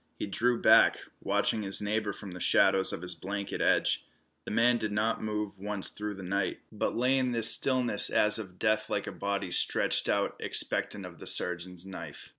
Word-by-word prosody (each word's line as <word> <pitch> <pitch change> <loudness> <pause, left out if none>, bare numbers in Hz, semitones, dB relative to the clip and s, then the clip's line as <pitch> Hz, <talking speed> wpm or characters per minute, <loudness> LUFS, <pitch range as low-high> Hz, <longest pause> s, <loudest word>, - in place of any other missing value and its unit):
He - - -3
drew 120 +4 0
back, - - +5 0.2
watching 110 - 0
his 95 -1 +2
neighbor 105 0 -1
from 100 -1 -9
the 90 - -9
shadows 95 +2 +4
of 85 - -5
his 90 - -1
blanket 100 +1 -5
edge. - - +2 0.4
The - - -6
man 120 +2 +2
did 110 -2 -3
not 110 +2 -1
move 105 -2 -4
once 100 -1 -3
through 105 0 -6
the 95 - -9
night, 95 +1 -2
but - - -2
lay 130 +3 +2
in 130 -1 -1
this 115 -1 +7
stillness 125 -5 +2
as 105 +1 +3
of 95 -4 -9
death 110 0 0
like 100 - -2
a - - -5
body 100 -2 -3
stretched - - +1
out - - 0
expectant 100 -2 -1
of 85 -2 -12
the - - -9
surgeon's 90 +1 -3
knife. 95 -1 -9
105 Hz, 195 wpm, -29 LUFS, 95-110 Hz, 0.4 s, this